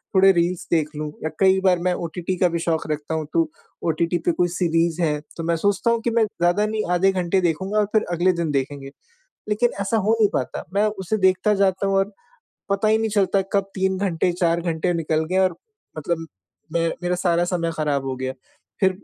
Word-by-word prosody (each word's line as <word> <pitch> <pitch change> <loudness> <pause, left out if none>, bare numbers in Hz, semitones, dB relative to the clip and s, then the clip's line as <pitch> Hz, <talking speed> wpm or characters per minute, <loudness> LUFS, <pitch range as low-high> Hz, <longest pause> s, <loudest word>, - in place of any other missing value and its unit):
थोड़े 195 +1 +7
रील्स 175 0 0
देख 155 -3 +2
लूँ 150 0 -4
या 160 - -1
कई 190 0 +5
बार 185 -2 +3
मैं 180 +1 +1
ओटीटी 175 +2 -3
का 180 - +4
भी 170 0 -2
शौक़ 165 -1 -1
रखता 150 +1 -3
हूँ, 155 - -2
तो 165 -2 +2 0.4
ओटीटी 170 +2 +1
पे 175 - +4
कोई 175 +1 +1
सीरीज़ 170 -1 0
है, 150 -2 +1 0.2
तो 165 - -4
मैं 170 0 +1
सोचता 205 +6 +1
हूँ 230 - +1
कि 235 - 0
मैं 230 -1 +3
ज़्यादा 195 +1 +1
नहीं 215 0 -1
आधे 185 +2 +3
घंटे 185 0 0
देखूँगा 190 +5 -1
और 210 - +3
फिर 215 - +3
अगले 175 +2 +3
दिन 170 -3 -2
देखेंगे, 135 0 -3 0.6
लेकिन 225 +3 +2
ऐसा 210 +3 0
हो 220 +2 +2
नहीं 210 -2 +5
पाता 130 - -2
मैं 205 +2 +3
उसे 210 0 -2
देखता 190 +2 +3
जाता 190 0 +1
हूँ 195 - +1
और 195 +2 +1 0.6
पता 200 +2 +2
ही 220 +1 +4
नहीं 220 -1 -1
चलता 195 -1 +2
कब 195 0 +1
3 190 -1 0
घंटे 180 -2 0
4 170 -1 +1
घंटे 170 +1 -1
निकल 160 -1 0
गए 190 - +2
और 185 -3 +2 0.4
मतलब 165 +1 -2 0.5
मैं 165 0 +1
मेरा 180 0 0
सारा 175 -1 +1
समय 175 -2 -1
ख़राब 145 -3 0
हो 130 - -2
गया। 130 0 -3 0.5
फिर 190 -1 +5
180 Hz, 215 wpm, -22 LUFS, 165-195 Hz, 0.6 s, थोड़े